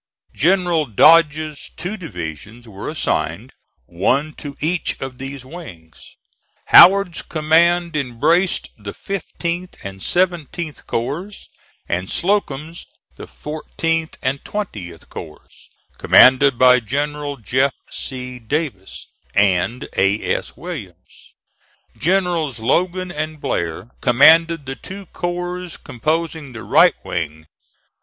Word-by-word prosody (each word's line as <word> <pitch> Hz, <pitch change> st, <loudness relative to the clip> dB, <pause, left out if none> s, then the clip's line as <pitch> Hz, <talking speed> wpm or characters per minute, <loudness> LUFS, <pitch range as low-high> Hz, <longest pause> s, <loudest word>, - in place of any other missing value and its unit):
General 175 Hz, -1 st, +2 dB
Dodge's 155 Hz, +4 st, +4 dB
two 180 Hz, +5 st, -4 dB
divisions 105 Hz, -, -8 dB
were 100 Hz, -2 st, -7 dB
assigned, -, -, -2 dB, 0.3 s
one 135 Hz, -, 0 dB
to 145 Hz, -2 st, -9 dB
each 170 Hz, +3 st, -1 dB
of 130 Hz, -1 st, -7 dB
these 135 Hz, -1 st, -7 dB
wings. 90 Hz, -, -12 dB, 0.5 s
Howard's 190 Hz, -1 st, +7 dB
command 170 Hz, +2 st, +2 dB
embraced 150 Hz, +7 st, +1 dB
the 100 Hz, -1 st, -7 dB
15th 180 Hz, -2 st, -4 dB
and 95 Hz, 0 st, -7 dB
17th 175 Hz, -, -2 dB
corps, 165 Hz, -, -4 dB, 0.4 s
and 90 Hz, +2 st, -2 dB
Slocum's 170 Hz, -4 st, -1 dB, 0.3 s
the -, -, -10 dB
14th 160 Hz, +1 st, -3 dB
and 135 Hz, +2 st, -1 dB
20th 100 Hz, -, -6 dB
corps, 75 Hz, -, -11 dB, 0.3 s
commanded 130 Hz, 0 st, +6 dB
by 125 Hz, 0 st, +6 dB
Generals 145 Hz, +3 st, -3 dB
Jeff. 130 Hz, +6 st, +1 dB, 0.2 s
C. 125 Hz, -1 st, -6 dB
Davis 120 Hz, -, -4 dB, 0.3 s
and 100 Hz, +4 st, +1 dB
A. 100 Hz, +3 st, +1 dB
S. -, -, -5 dB
Williams. 125 Hz, -, -10 dB, 0.6 s
Generals 175 Hz, -6 st, 0 dB
Logan 180 Hz, +9 st, 0 dB
and 155 Hz, -1 st, -4 dB
Blair 85 Hz, -, -3 dB
commanded 160 Hz, +5 st, +5 dB
the 135 Hz, 0 st, -5 dB
two 195 Hz, +6 st, -9 dB
corps 175 Hz, 0 st, -4 dB
composing 155 Hz, +1 st, -3 dB
the 110 Hz, -, -8 dB
right -, -, +5 dB
wing. 80 Hz, -2 st, -4 dB
150 Hz, 105 wpm, -20 LUFS, 120-170 Hz, 0.6 s, Howard's